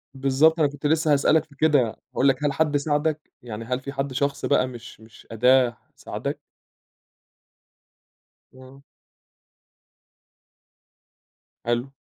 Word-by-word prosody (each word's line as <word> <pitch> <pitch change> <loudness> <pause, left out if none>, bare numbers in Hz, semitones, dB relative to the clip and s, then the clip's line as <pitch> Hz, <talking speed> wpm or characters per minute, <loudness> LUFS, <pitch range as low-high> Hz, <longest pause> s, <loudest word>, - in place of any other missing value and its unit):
بالضبط 140 +5 +3
أنا 150 - +4
كُنت 145 +1 -10
لسّه 155 0 +2
هاسألك 145 +2 +3
في 145 -2 -21
كده، 140 -6 +2 0.2
أقول 135 - +2
لك 135 +1 +1
هل 145 -1 +1
حد 150 0 +1
ساعدك؟ 150 +1 -1
يعني 115 -1 -7
هل 125 +2 -2
في 140 +1 -7
حد 135 0 -3
شخص 140 +2 -1
بقى 130 -2 +2
مش 120 -3 -11
مش 110 0 -17
أداة، 125 +1 +3 0.2
ساعدك؟ - - -5 2.2
إمم. 130 +1 -15 2.8
حلو. 120 +3 -1
140 Hz, 120 wpm, -24 LUFS, 125-145 Hz, 2.8 s, أنا